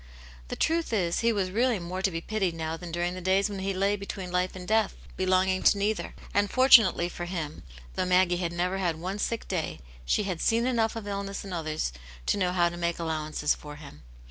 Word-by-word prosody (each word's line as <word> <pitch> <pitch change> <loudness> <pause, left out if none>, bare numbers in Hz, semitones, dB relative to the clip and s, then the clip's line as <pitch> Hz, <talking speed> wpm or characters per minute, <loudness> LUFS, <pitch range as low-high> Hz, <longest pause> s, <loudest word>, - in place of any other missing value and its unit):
The - - -4
truth 330 -2 0
is 175 -5 +1
he 230 0 +3
was 195 -4 -1
really 240 +3 +2
more 180 +1 -5
to 195 - +2
be 165 -2 -4
pitied 195 -3 -1
now 160 0 -3
than 170 0 -8
during 175 +1 -1
the 185 - -6
days 190 +3 +2
when 200 - -4
he 195 +1 -1
lay 195 +2 +1
between 195 -2 -6
life 180 +1 0
and 180 -1 -8
death, 220 -2 +2 0.2
belonging 185 0 +2
to - - +5
neither. 210 +1 -1 0.2
And 205 0 +2
fortunately 255 -9 +6
for 175 0 -6
him, 165 -4 -5 0.3
though 185 - -1
Maggie 180 -1 +4
had 175 -2 -2
never 180 +2 -1
had 175 -4 0
one 190 +4 -4
sick 230 +2 -2
day, 175 -5 -2 0.2
she 60 - +1
had 185 -4 -3
seen 230 +1 +2
enough 230 -3 +1
of 225 -2 -5
illness 200 0 -4
in 195 - -6
others 155 - -2 0.3
to - - +1
know 180 -2 +1
how 175 -1 +3
to 175 - -8
make 170 -1 -1
allowances 155 -2 -1
for 150 -1 -9
him. 145 - -12
185 Hz, 220 wpm, -28 LUFS, 170-200 Hz, 0.3 s, fortunately